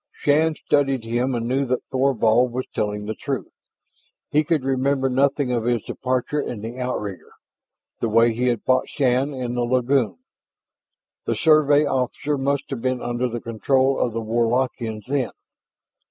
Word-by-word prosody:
Shann 155 Hz, +2 st, +2 dB
studied 135 Hz, -5 st, +1 dB
him 120 Hz, +3 st, -1 dB
and 115 Hz, 0 st, -2 dB
knew 130 Hz, +3 st, +1 dB
that 125 Hz, 0 st, -1 dB
Thorvald 125 Hz, -2 st, +2 dB
was 130 Hz, +1 st, -2 dB
telling 105 Hz, 0 st, -2 dB
the 110 Hz, -, -3 dB
truth. 130 Hz, -3 st, -4 dB, 0.8 s
He 150 Hz, +1 st, +3 dB
could 155 Hz, -2 st, 0 dB
remember 135 Hz, 0 st, +1 dB
nothing 135 Hz, 0 st, +1 dB
of 120 Hz, -2 st, -1 dB
his 120 Hz, -3 st, +1 dB
departure 130 Hz, +3 st, -2 dB
in 115 Hz, -6 st, -5 dB
the 115 Hz, +4 st, -6 dB
outrigger, 105 Hz, -7 st, -4 dB, 0.7 s
the 115 Hz, -, -1 dB
way 115 Hz, +1 st, +4 dB
he 125 Hz, +3 st, 0 dB
had 120 Hz, -3 st, 0 dB
fought 130 Hz, 0 st, +2 dB
Shann 135 Hz, 0 st, +1 dB
in 125 Hz, -3 st, -4 dB
the 125 Hz, -, -1 dB
lagoon. 125 Hz, 0 st, +1 dB, 1.1 s
The -, -, 0 dB
Survey 150 Hz, -2 st, +4 dB
officer 140 Hz, +2 st, -1 dB
must 140 Hz, +1 st, 0 dB
have 130 Hz, -4 st, -4 dB
been 130 Hz, 0 st, 0 dB
under 120 Hz, +1 st, -1 dB
the 120 Hz, 0 st, -5 dB
control 130 Hz, +4 st, +1 dB
of 120 Hz, -, 0 dB
the 115 Hz, -, -2 dB
Warlockians 115 Hz, -1 st, -1 dB
then. 130 Hz, -4 st, -1 dB
125 Hz, 160 wpm, -22 LUFS, 115-135 Hz, 1.1 s, way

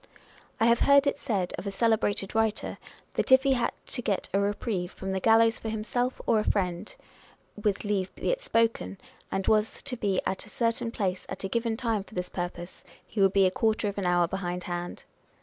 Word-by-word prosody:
I 225 Hz, -, +4 dB
have 235 Hz, 0 st, +4 dB
heard 280 Hz, 0 st, +5 dB
it 280 Hz, 0 st, 0 dB
said 195 Hz, -10 st, -1 dB
of 200 Hz, -, -6 dB
a -, -, 0 dB
celebrated 205 Hz, -2 st, +1 dB
writer, 220 Hz, -1 st, 0 dB, 0.3 s
that -, -, -1 dB
if 260 Hz, 0 st, +8 dB
he 275 Hz, -1 st, +4 dB
had 240 Hz, -2 st, +1 dB
to 245 Hz, -, -3 dB
get 200 Hz, -4 st, -1 dB
a 195 Hz, -, +3 dB
reprieve 200 Hz, -2 st, -1 dB
from 190 Hz, 0 st, -5 dB
the 190 Hz, -, 0 dB
gallows 225 Hz, +2 st, +4 dB
for 225 Hz, -, -4 dB
himself 245 Hz, +4 st, -1 dB
or 220 Hz, -, +3 dB
a -, -, 0 dB
friend 180 Hz, -5 st, -1 dB, 0.6 s
(with 210 Hz, -2 st, -1 dB
leave 200 Hz, -3 st, -1 dB
be -, -, -1 dB
it -, -, -1 dB
spoken), 230 Hz, -, 0 dB, 0.3 s
and 195 Hz, 0 st, -1 dB
was 215 Hz, 0 st, +1 dB
to 270 Hz, -3 st, -3 dB
be 200 Hz, -5 st, 0 dB
at 190 Hz, -, -3 dB
a -, -, -13 dB
certain 230 Hz, 0 st, -1 dB
place 190 Hz, -5 st, -2 dB
at -, -, -6 dB
a -, -, -1 dB
given 230 Hz, +2 st, -1 dB
time 225 Hz, -5 st, 0 dB
for 210 Hz, -, -16 dB
this 180 Hz, 0 st, -3 dB
purpose, 175 Hz, 0 st, -6 dB, 0.2 s
he 210 Hz, -, -3 dB
would 195 Hz, 0 st, +5 dB
be 195 Hz, -1 st, +5 dB
a 185 Hz, -, +3 dB
quarter 220 Hz, +2 st, +1 dB
of 200 Hz, -, -5 dB
an 190 Hz, -, -1 dB
hour 175 Hz, -1 st, +3 dB
behindhand. 175 Hz, -1 st, -4 dB
210 Hz, 210 wpm, -28 LUFS, 190-230 Hz, 0.6 s, if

